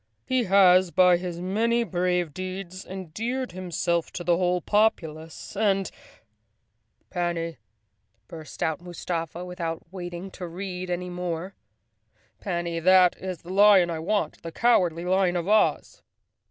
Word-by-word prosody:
He 255 -2 +1
has, 185 -2 +5
by 180 0 +5
his 175 -1 -5
many 225 +6 +1
brave 180 -5 -1
deeds, 185 +1 -6
endeared 215 +8 -4
hims 180 -2 -5
elf 170 -1 +1
to 175 - -5
the 175 0 +3
whole 180 0 +1
populace 165 -6 -1
and—" 195 -2 +1 1.2
"Panny!" 170 -2 -2 0.7
burst 160 -2 -8
out 160 0 -1
Mustafa, 175 -1 -5
without 170 -2 -4
waiting 175 0 -6
to 180 -2 -7
read 180 +1 -6
any 180 0 -3
more, 175 +1 -4 0.4
" 110 +1 -41
Panny, 170 -3 -2
that 185 +1 +5
is 185 -3 -6
the 180 +2 -7
lion 195 -3 +6
I 160 - -3
want, 200 +6 -1
the 165 - -7
Cow¬ 240 +7 +4
ardly 170 -1 -2
Lion 185 -1 +2
of 175 0 -2
Oz!" 215 +1 +2
180 Hz, 140 wpm, -26 LUFS, 170-190 Hz, 1.2 s, lion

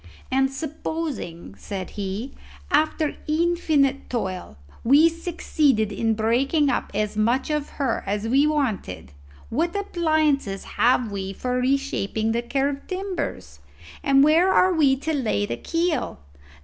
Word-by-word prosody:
"And 265 +1 +2
supposing," 280 - -5
said 190 -2 -6
he, 205 +5 -4 0.4
"after 310 0 +1
infinite 305 -4 +1
toil 185 - -4 0.3
we 285 +7 +6
succeeded 310 - 0
in 225 +2 0
breaking 270 +7 +2
up - - -2
as 210 0 -1
much 235 +7 +1
of 300 -1 -1
her 270 -5 0
as 205 +2 -1
we 275 +5 +4
wanted, 220 - -2 0.4
what 335 - 0
appliances 310 - 0
have 245 -2 +1
we 195 -1 -4
for 250 +5 -2
reshaping 250 -5 0
the 235 +1 0
curved 275 +3 -2
timbers? 370 - -4 0.4
and 275 0 +5
where 330 +5 +5
are 370 0 +4
we 290 -5 +4
to 305 +4 -3
lay 225 - 0
the 120 - -3
keel? 330 - -1
270 Hz, 130 wpm, -24 LUFS, 220-310 Hz, 0.4 s, we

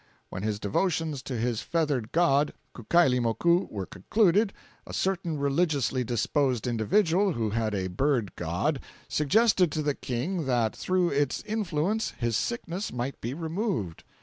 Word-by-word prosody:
When 95 - -5
his 105 0 -2
devotions 155 - -1
to 130 -1 -4
his 115 0 -1
feathered 145 -9 -1
god, 150 -4 +3 0.2
Kukailimoku, 130 - +2
were 100 -3 -4
concluded, 195 - +2 0.4
a - - -6
certain 175 -4 -1
religiously 140 -2 +1
disposed 125 +1 0
individual, 165 - +2
who 110 -5 -1
had 110 -1 0
a 95 -1 -1
bird 110 +2 0
god, 95 - -1 0.3
suggested 180 +3 +3
to 155 - -1
the 145 -1 +1
King 140 +8 -3
that 120 -4 +1
through 185 -1 +1
its 140 -1 0
influence 210 -1 -1
his 120 -2 0
sickness 195 - -2
might 125 +2 -4
be 120 +4 -3
removed. 165 - -3
140 Hz, 140 wpm, -27 LUFS, 115-175 Hz, 0.4 s, god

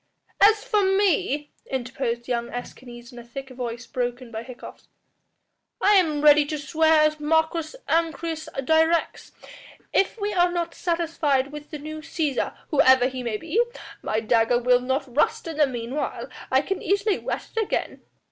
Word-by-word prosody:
"As 425 +1 +6
for 455 -5 +1
me," 380 -7 +1 0.2
interposed 240 -2 -3
young 235 -1 -2
Escanes 245 0 -9
in 240 - -11
a - - -10
thick 265 +3 -9
voice 240 -2 -5
broken 245 -1 -4
by 220 -1 -5
hiccoughs, 245 +1 -11 0.9
"I 415 - +4
am 320 -7 +3
ready 300 0 +7
to 305 - -3
swear 315 +1 +3
as 305 0 +1
Marcus 320 +3 0
Ancyrus 325 0 -1 0.2
directs. 320 +2 +1 0.6
If 390 +4 +1
we 415 0 -2
are 355 -1 +3
not 340 -1 -2
satisfied 315 -6 0
with 295 0 -9
the 305 - -6
new 310 +2 -7
Cæsar, 310 -3 -2 0.2
whoever 260 -4 +5
he 260 -1 -6
may 235 -3 -2
be, 330 - 0 0.4
my 215 - -1
dagger 230 +1 +3
will 250 0 +3
not 260 0 -2
rust 450 +9 +1
in 325 -2 -5
the 300 -2 +4
meanwhile; 250 +3 -4 0.2
I 265 +2 +3
can 390 +4 -3
easily 400 +1 +1
whet - - -5
it 450 - +2
again." 425 - -3
295 Hz, 160 wpm, -24 LUFS, 250-330 Hz, 0.9 s, ready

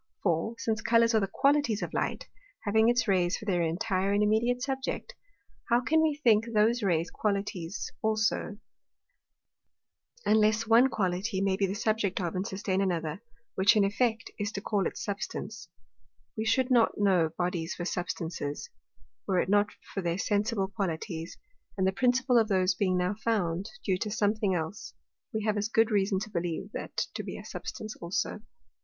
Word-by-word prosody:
For, 175 +5 0
since 220 0 -1
Colours 230 0 +4
are 220 - +5
the 195 - 0
Qualities 275 -1 +2
of - - -5
Light, - - -2 0.4
having 220 +2 +3
its 240 -1 +2
Rays 180 -1 +2
for 215 - -10
their 180 -4 +1
intire 185 +4 0
and 205 +1 +3
immediate 235 +4 +2
Subject, 265 -1 -3 0.6
how 235 - +5
can 315 +6 +2
we 315 -2 +2
think 230 -7 +3
those 225 +3 +3
Rays 170 -4 +1
Qualities 200 -3 -2
also, 220 -1 0 1.7
unless 215 +1 +3
one 230 +4 +6
Quality 190 -1 -1
may 195 -1 +1
be 195 0 +1
the 190 - -3
Subject 210 -2 0
of 175 -3 -2
and 185 +2 -2
sustain 190 0 -1
another; 170 -3 -1 0.3
which 190 +3 +4
in 210 - +4
effect 220 +3 0
is 205 0 -1
to - - -3
call 200 -1 0
it - - -7
Substance? 200 -1 -5 0.7
We 220 - -2
should 255 +3 +2
not 235 -3 +4
know 185 -5 +3
Bodies 175 -1 -2
for 175 - -4
Substances, 165 -5 -4 0.6
were 185 - +1
it - - 0
not 205 +1 +4 0.3
for 195 - -2
their 170 -1 -1
sensible 205 0 0
Qualities; 170 -4 -4 0.4
and 190 - +1
the 190 - +3
principal 250 +3 +3
of 220 - +2
those 190 -2 +2
being 185 -1 +1
now 180 +2 +1
found 200 -5 -1 0.2
due 185 -3 +1
to 215 - -2
something 205 -2 +1
else, 170 +5 -5 0.4
we 220 -3 -2
have 215 -1 0
as 205 +1 0
good 225 +1 +3
reason 195 -1 +2
to 215 0 -6
believe 170 -2 -3
that - - -3
to - - -3
be - - -6
a - - -10
Substance 215 0 -6
also. 170 +4 -2
205 Hz, 175 wpm, -29 LUFS, 185-225 Hz, 1.7 s, one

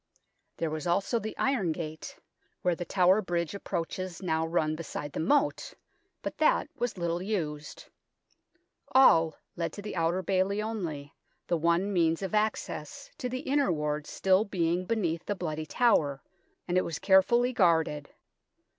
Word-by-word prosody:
There 165 -2 -2
was 155 +1 -4
also 200 +7 +1
the 220 0 -6
Iron 240 -11 +1
Gate, 160 -1 -6 0.5
where 180 - +3
the 175 +1 -5
Tower 185 +3 +4
Bridge 170 -3 -2
approaches 185 -1 -4
now 160 -3 0
run 155 -2 0
beside 150 -2 -6
the - - -3
moat, 280 - +1 0.5
but - - -5
that 310 - +3
was 245 -4 -2
little 170 0 -1
used. 155 -7 -4 1.1
All 165 -12 +6 0.2
led 170 -1 -2
to 205 - -7
the 210 - -5
Outer 170 +2 0
Bailey 190 +2 +1
only, 170 -10 -4 0.3
the 175 - 0
one 170 +5 +1
means 165 -2 +2
1 - - -1
of 190 - -6
access 215 - -2
to 250 -4 -2
the 255 +1 -4
Inner 280 -6 +1
Ward 150 -1 -2
still 190 +1 +2
being 180 -3 -1
beneath 175 -7 -1
the 205 - -1
Bloody 155 -4 -4
Tower, 150 - +2 0.4
and 180 0 +2
it - - 0
was 160 - -4
care 190 -1 +6
fully 240 +6 +1
guarded. 160 -8 +2
175 Hz, 160 wpm, -29 LUFS, 160-205 Hz, 1.1 s, All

